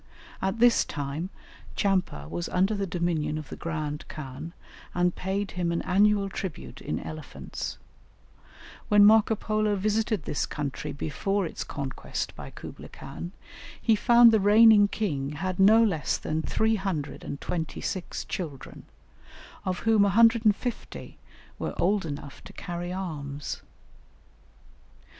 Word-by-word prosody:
At 190 +3 -1
this 240 0 +5
time, 145 +5 -4 0.5
Tchampa 180 - 0
was 85 +2 -4
under 190 +4 +2
the 200 -2 -2
dominion 170 -3 -1
of 155 - -7
the - - -6
grand 155 -3 -4
khan, 145 +2 -7 0.4
and 180 0 +2
paid 195 +2 -2
him 175 -1 -1
an 170 - -1
annual 200 +2 +3
tribute 190 -4 -6
in 75 - -3
elephants; 155 -3 -6 1.1
when 205 -1 +7
Marco 220 +1 +6
Polo 215 0 0
visited 215 -1 0
this 145 - -2
country 145 -3 -4
before 195 +7 -1
its 165 - -5
conquest 140 -3 -4
by - - -8
Kublaï - - -10
Khan, 140 +6 -8 0.5
he 225 - +3
found 235 +2 +7
the 220 - +4
reigning 210 +1 +7
king 150 -10 -2
had 185 +4 -3
no 220 +4 +7
less 180 -9 +1
than 155 +1 -2
326 180 -3 -2
children, 160 -10 -6 0.8
of 185 -1 -2
whom 225 -2 +4
150 225 +2 +2 0.4
were - - -4
old 195 -1 +2
enough 145 -1 -7
to - - -11
carry 175 0 -5
arms. 150 -6 -5
185 Hz, 125 wpm, -27 LUFS, 155-210 Hz, 1.1 s, when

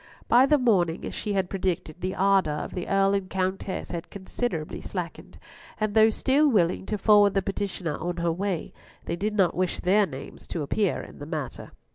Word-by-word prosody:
By 250 +3 +6
the 300 - +5
morning, 185 - +2
as - - -5
she 210 - -3
had 190 -2 +1
predicted, 180 -3 -3
the 185 +1 -2
ardour 190 -6 +3
of - - -5
the 180 - -4
Earl 195 0 +3
and 195 -2 -1
Countess 190 0 -2
had 170 -1 -5
considerably 190 -4 -4
slackened; 180 -4 -6 0.4
and 215 -1 0
though 220 0 +6
still 275 +7 +2
willing 190 -5 +1
to 210 - -1
forward 205 -1 +5
the 195 - +2
petitioner 190 -6 -3
on 175 +2 -3
her 170 0 +1
way, 185 0 -3 0.3
they - - -2
did 210 +4 -2
not 190 -5 +3
wish 185 -1 -1
their 200 +3 +3
names 135 -2 -9
to 160 - -3
appear 195 +6 0
in - - -12
the 145 - -7
matter. 155 -4 -5
190 Hz, 195 wpm, -26 LUFS, 175-205 Hz, 0.4 s, By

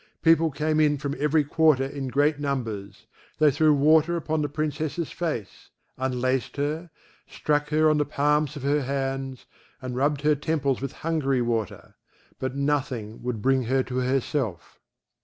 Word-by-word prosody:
People 165 0 +5
came 155 +2 0
in 150 -1 +3
from 140 0 -3
every 150 +1 +3
quarter 145 -2 +3
in 135 0 -5
great 145 +4 +1
numbers; 115 -8 -4 0.3
they 150 -1 +5
threw 155 +3 +3
water 155 +3 +4
upon 160 -1 -1
the 145 - -1
Princess's 155 +2 -3
face, 155 - -5 0.3
unlaced 130 0 -1
her, 155 +4 -2 0.4
struck 150 0 -1
her 155 +1 +3
on 155 -1 +3
the - - +3
palms 150 +1 +1
of 145 - -7
her 145 +1 +2
hands, 135 -1 -3 0.3
and 130 -2 -5
rubbed 140 +2 +1
her 150 +1 +4
temples 145 -3 -1
with 135 - -3
Hungary 140 -6 +1
water; 115 -4 -3 0.5
but 130 0 -3
nothing 130 -6 -2
would 120 -4 -4
bring 130 -1 +2
her 130 +2 +1
to 125 0 -5
herself. 130 - -2
140 Hz, 160 wpm, -25 LUFS, 130-150 Hz, 0.5 s, People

